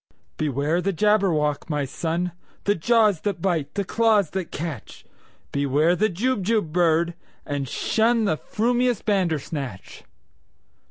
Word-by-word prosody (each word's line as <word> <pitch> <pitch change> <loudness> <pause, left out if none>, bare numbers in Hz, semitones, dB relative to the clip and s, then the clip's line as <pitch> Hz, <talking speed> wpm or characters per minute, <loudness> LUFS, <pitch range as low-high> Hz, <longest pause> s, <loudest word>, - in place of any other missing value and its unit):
"Beware 150 +3 0
the 195 - 0
Jabberwock, 170 -7 +1
my 150 -2 0
son! 170 +5 -2 0.3
The 205 - +3
jaws 210 -1 +3
that 200 -4 -2
bite, 165 -5 -1
the 200 - 0
claws 215 -4 +2
that 190 -2 -4
catch! 155 -6 -6 0.5
Beware 145 +5 +2
the 215 +4 +2
Jubjub 210 -3 0
bird, 170 0 +2 0.3
and 145 -2 -3
shunThe 220 - +1
frumious 245 +1 0
Bandersnatch!" 155 - -2
175 Hz, 115 wpm, -24 LUFS, 155-210 Hz, 0.5 s, The